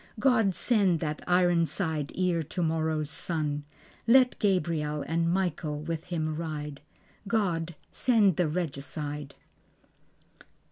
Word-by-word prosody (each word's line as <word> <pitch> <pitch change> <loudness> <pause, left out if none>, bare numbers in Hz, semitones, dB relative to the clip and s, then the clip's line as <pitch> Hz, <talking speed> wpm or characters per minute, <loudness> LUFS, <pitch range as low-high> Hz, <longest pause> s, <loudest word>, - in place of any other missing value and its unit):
God 225 -7 +3
send 200 -8 +3
that 155 -2 -3
ironside 170 -3 +1
ere 180 -2 +1
tomorrow's 160 -2 -1
sun; 150 -3 -2 0.4
Let 250 +1 +5
Gabriel 165 -7 0
and 165 +1 +1
Michael 170 -5 -1
with 165 0 -4
him 155 -3 -2
ride. 150 -3 -5 0.5
God 175 -6 0 0.2
send 215 -8 +3
the 175 - +2
Regicide. 150 -2 -4
165 Hz, 100 wpm, -28 LUFS, 150-185 Hz, 0.5 s, Let